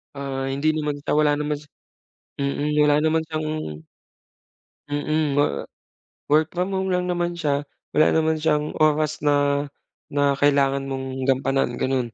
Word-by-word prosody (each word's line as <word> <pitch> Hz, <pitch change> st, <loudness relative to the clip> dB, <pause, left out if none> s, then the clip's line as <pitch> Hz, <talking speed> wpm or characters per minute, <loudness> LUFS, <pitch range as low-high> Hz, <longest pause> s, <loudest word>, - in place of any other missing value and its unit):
Ah, 135 Hz, -1 st, -3 dB
hindi 140 Hz, +3 st, +1 dB
naman 150 Hz, -2 st, -2 dB
siya, -, -, -2 dB
wala 150 Hz, -1 st, +3 dB
naman 150 Hz, 0 st, -2 dB
siya 145 Hz, 0 st, -18 dB, 0.7 s
mm, 145 Hz, +2 st, -1 dB
wala 145 Hz, 0 st, +4 dB
naman 160 Hz, +1 st, +2 dB
siyang 155 Hz, -1 st, -3 dB, 1.4 s
Mm, 145 Hz, 0 st, 0 dB
wor 145 Hz, -, +1 dB, 0.6 s
work 155 Hz, +2 st, +3 dB
from 180 Hz, +2 st, -1 dB
home 190 Hz, -1 st, -1 dB
lang 180 Hz, 0 st, 0 dB
naman 175 Hz, -1 st, 0 dB
siya, 145 Hz, -4 st, -1 dB, 0.3 s
wala 155 Hz, -, +5 dB
naman 160 Hz, 0 st, +2 dB
siyang 150 Hz, -1 st, +1 dB
oras 155 Hz, 0 st, +2 dB
na, 145 Hz, 0 st, +2 dB, 0.5 s
na 140 Hz, -1 st, +2 dB
kailangan 140 Hz, -1 st, +2 dB
mong 130 Hz, -1 st, -4 dB
gampanan 135 Hz, -1 st, 0 dB
gano'n. 130 Hz, -3 st, 0 dB
145 Hz, 145 wpm, -23 LUFS, 140-155 Hz, 1.4 s, wala